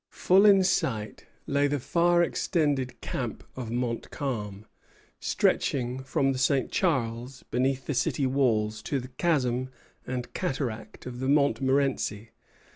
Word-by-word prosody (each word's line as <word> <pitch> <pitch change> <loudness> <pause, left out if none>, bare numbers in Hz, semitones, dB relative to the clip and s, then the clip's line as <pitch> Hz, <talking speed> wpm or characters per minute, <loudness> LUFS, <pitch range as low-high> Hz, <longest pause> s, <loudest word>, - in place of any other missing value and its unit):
Full 195 +3 +4
in 195 -2 +6
sight 110 - -1 0.2
lay 140 +1 +2
the 145 0 -1
far 175 +5 +3
extended 145 -7 0
camp - - -4
of 125 -3 -5
Montcalm, 115 -3 -3 0.5
stretching 125 -1 0
from 135 +1 +1
the 130 - -3
St. 135 -1 +1
Charles, 125 - -1
beneath 130 +2 0
the 145 - -2
city 135 +2 0
walls, 110 -5 +1
to 140 - -2
the 125 0 -8
chasm 130 -3 0 0.4
and 125 -1 -4
cataract 110 -6 -4
of 125 -1 -7
the 130 - -2
Montmorenci. 135 -6 +1
130 Hz, 125 wpm, -27 LUFS, 120-140 Hz, 0.5 s, in